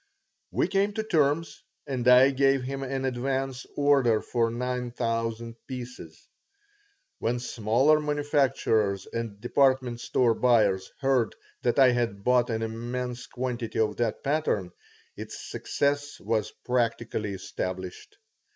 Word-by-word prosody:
We - - +1
came 200 +2 +1
to 220 - -2
terms, 160 -4 +1 0.2
and 130 -3 -2
I 125 +2 +7
gave 135 -1 +2
him 135 +1 -4
an 135 0 -3
advance 130 +1 -2
order 140 -6 +4
for 115 -2 0
nine 125 +1 -3
thousand 115 -1 -3
pieces. 125 - -8 0.9
When 120 +2 0
smaller 120 +5 +2
manufacturers 135 - +1
and 115 -3 -5
department 130 0 +2
store 120 -3 +2
buyers 105 -6 +2
heard 130 -5 +2 0.3
that 120 - +1
I 130 -2 +7
had 115 -5 -1
bought 125 0 +3
an 115 -1 -1
immense 120 +2 -4
quantity 120 -2 -4
of 105 -1 +1
that 115 -2 -1
pattern 135 - 0 0.4
its - - -8
success 145 0 -2
was 110 0 -1 0.2
practically 115 -4 -1
established. 95 -1 -6
125 Hz, 125 wpm, -27 LUFS, 115-135 Hz, 0.9 s, I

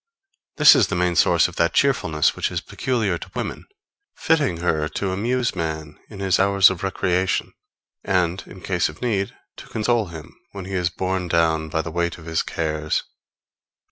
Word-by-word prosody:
This 150 -1 +9
is - - +3
the 90 -2 0
source 85 0 +4
of 90 - -11
that 85 +1 +1
cheerfulness 80 - +2
which - - -1
is - - -2
peculiar 110 -9 -2
to - - -9
women, - - -5 0.5
fitting 150 - +1
her 80 -3 0
to 95 -2 -3
amuse 120 +5 -1
man 80 -3 -4
in 105 - -10
his 95 -1 +1
hours 100 0 +5
of 95 - -6
recreation, 95 -1 0 0.5
and, 90 -1 0
in 95 - -12
case 90 -4 0
of 75 - -11
need, 100 -5 -1 0.2
to - - -11
console 110 -1 0
him 80 -1 -10 0.2
when 100 -2 -7
he 95 - -7
is 90 -2 +1
borne 95 0 -2
down 80 -1 +1
by 80 +1 -1
the 85 - -6
weight 85 0 -1
of 80 - -13
his 80 0 0
cares. 75 -1 -2
90 Hz, 175 wpm, -22 LUFS, 80-100 Hz, 0.5 s, This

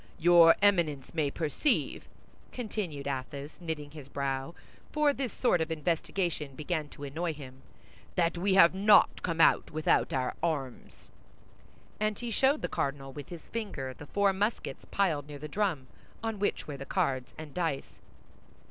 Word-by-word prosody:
Your 170 -1 +7
Eminence 165 -10 +2
may 155 -4 +1
perceive," 160 - -1 0.4
continued 200 - -4
Athos, 140 +2 -4
knitting 155 -4 -4
his 145 -3 -10
brow, 140 +3 -3 0.4
for 300 -1 +3
this 265 -4 -3
sort 180 -9 +2
of 160 - -1
investigation 160 -2 -1
began 155 +1 -2
to 145 - -11
annoy 160 +4 -3
him, 130 -2 -11 0.5
"that 170 -1 +2
we 190 +2 +1
have 170 -2 +7
not 200 +2 +5
come 165 -2 -2
out - - +5
without 155 0 +2
our 130 -1 0
arms." 140 -7 -4 0.9
And 215 -1 0
he 240 -1 -5
showed 270 +6 +2
the - - +1
cardinal, 135 -1 -3
with 145 -1 -8
his 170 -2 -9
finger, 190 - -4
the 145 +3 -12
four 200 -1 +2
muskets 205 +4 -2
piled 160 -8 +1
near 145 -1 -8
the 150 +2 -7
drum, 170 -5 -1 0.4
on 225 -2 -2
which 205 - -1
were 145 -2 -5
the 140 - -7
cards 135 -9 -1
and 155 -3 -9
dice. 165 -6 -3
160 Hz, 155 wpm, -30 LUFS, 140-195 Hz, 0.9 s, Your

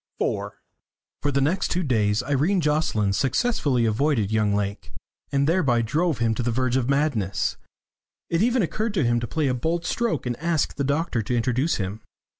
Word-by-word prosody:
IV - - -2 0.7
For 145 - 0
the 140 0 +1
next 165 +8 +1
two 180 +1 0
days 110 -5 +1
Irene 145 +8 +1
Jocelyn 150 - +1
successfully 135 - +1
avoided 110 -1 +1
young 105 -2 +2
Lake, 100 0 -3 0.4
and 140 0 +2
thereby 140 -9 +2
drove 155 +5 0
him 115 -1 +1
to 120 - -3
the 120 - -1
verge 125 +1 0
of 130 -1 0
madness. 130 - 0 0.7
It 165 +1 0
even 240 0 +2
occurred 215 +5 -2
to 170 - +2
him 120 0 +2
to 120 - -4
play 155 +1 0
a 130 - +1
bold 165 +7 -1
stroke 225 - -1
and 120 -1 -1
ask 165 -2 0
the 140 - -2
doctor 145 -3 0
to 120 +3 -1
introduce 125 +7 +1
him. 100 +2 -4
135 Hz, 185 wpm, -24 LUFS, 115-160 Hz, 0.7 s, young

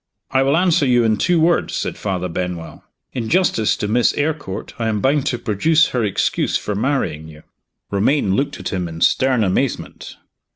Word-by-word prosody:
"I 130 - +3
will 135 +3 +2
answer 175 -5 +2
you 120 -1 +3
in 110 -2 +2
two 175 - +2
words," 170 +2 +1
said - - -3
Father 90 -3 -3
Benwell. 90 -1 -5 0.3
"In 115 -3 -3
justice 175 - +2
to 105 - -2
Miss 115 +2 +2
Eyrecourt, 150 -9 -3
I 115 - -1
am 110 -2 0
bound 135 +4 +1
to 120 - 0
produce 155 +11 +2
her 125 -2 -1
excuse 100 -3 0
for 105 - -4
marrying 100 - -1
you." 75 -1 -14 0.5
Romayne 100 0 +1
looked 140 +5 -2
at - - -4
him 90 -2 -2
in 80 0 -8
stern 130 +1 +3
amazement. 110 +7 -2
115 Hz, 180 wpm, -19 LUFS, 95-140 Hz, 0.5 s, I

